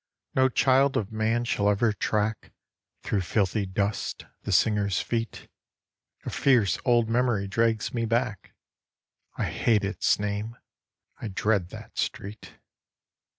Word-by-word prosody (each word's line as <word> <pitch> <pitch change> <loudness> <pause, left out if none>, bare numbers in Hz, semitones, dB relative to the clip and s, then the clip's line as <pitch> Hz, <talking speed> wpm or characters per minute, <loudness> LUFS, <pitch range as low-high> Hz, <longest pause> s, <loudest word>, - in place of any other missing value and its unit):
No 130 0 +4
child 130 +3 +3
of 105 -1 -2
man 110 +2 0
shall 105 -3 +1
ever 105 +2 +2
track, 105 +1 -2 0.5
Through 100 - 0
filthy 100 +2 0
dust, 100 +2 -2 0.2
the - - -4
singer's 100 -3 +2
feet 115 -3 -3 0.8
A - - -3
fierce 120 -8 +3
old 120 -3 +3
memory 115 -4 +1
drags 110 +2 0
me 115 -1 0
back; 115 -3 -2 0.8
I - - 0
hate 110 -3 +1
its 100 -2 +1
name 105 +3 -3 0.6
I - - -3
dread 100 -2 0
that - - -10
street. 105 +3 -4
110 Hz, 125 wpm, -27 LUFS, 100-115 Hz, 0.8 s, No